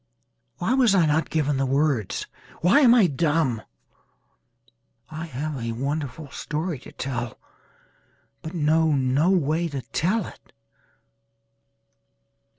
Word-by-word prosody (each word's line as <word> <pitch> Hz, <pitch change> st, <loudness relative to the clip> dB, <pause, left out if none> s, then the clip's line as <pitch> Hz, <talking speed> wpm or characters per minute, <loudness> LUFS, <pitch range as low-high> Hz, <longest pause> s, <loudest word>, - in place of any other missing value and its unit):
Why 185 Hz, +7 st, 0 dB
was 250 Hz, -6 st, +4 dB
I 175 Hz, -4 st, +4 dB
not 155 Hz, +1 st, +1 dB
given 145 Hz, -3 st, 0 dB
words? 135 Hz, -6 st, 0 dB, 0.4 s
Why 180 Hz, -, +5 dB
am 245 Hz, -4 st, +6 dB
I 225 Hz, -5 st, +6 dB
dumb? 145 Hz, -6 st, +1 dB, 1.5 s
I 160 Hz, +2 st, -5 dB
have 145 Hz, -1 st, -4 dB
a 115 Hz, 0 st, -2 dB
wonderful 140 Hz, +2 st, -4 dB
story 155 Hz, 0 st, -3 dB
to -, -, -13 dB
tell 120 Hz, -3 st, -4 dB, 1.0 s
but 160 Hz, +3 st, -7 dB
know 160 Hz, 0 st, +2 dB
no 135 Hz, +4 st, +2 dB
way 170 Hz, -2 st, +1 dB
to 140 Hz, -5 st, -5 dB
tell 190 Hz, +4 st, 0 dB
it. -, -, -14 dB
155 Hz, 115 wpm, -24 LUFS, 135-170 Hz, 1.5 s, am